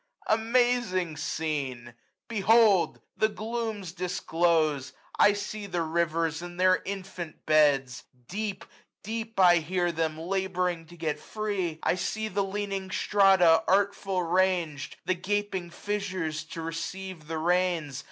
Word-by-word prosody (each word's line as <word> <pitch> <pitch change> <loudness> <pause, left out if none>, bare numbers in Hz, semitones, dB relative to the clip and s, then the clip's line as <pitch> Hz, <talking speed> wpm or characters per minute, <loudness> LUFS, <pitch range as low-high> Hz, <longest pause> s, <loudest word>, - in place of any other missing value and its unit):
Amazing 225 -6 +1
scene! 135 -8 -3 0.3
Behold! 215 -3 +4
the 220 - +2
glooms 220 -4 -4
disclose; 165 -5 0 0.3
805 - - +8
1 205 - +1
see 205 +1 -5
the 175 -3 -1
rivers 165 0 0
in 175 0 -8
their 185 0 +4
infant 185 -4 -6
beds! 140 -5 +3 0.2
Deep, 200 -1 -4 0.4
deep 225 0 -5
I 175 -2 +7
hear 175 +2 0
them, 160 -1 -1
laboring 180 -1 -1
to 175 +1 -14
get 160 -2 -2
free! 200 -7 -3
I - - +3
see 220 +4 -2
the 200 +1 0
leaning 195 -1 -3
strata, 190 -4 +4
artful 195 -1 +1
rang'd; 170 -5 0
The 185 - +2
gaping 190 -1 -2
fissures 185 -5 -3
to 165 0 -7
receive 165 0 -5
the 160 0 -3
rains. 170 -4 0
180 Hz, 125 wpm, -28 LUFS, 165-200 Hz, 0.4 s, 805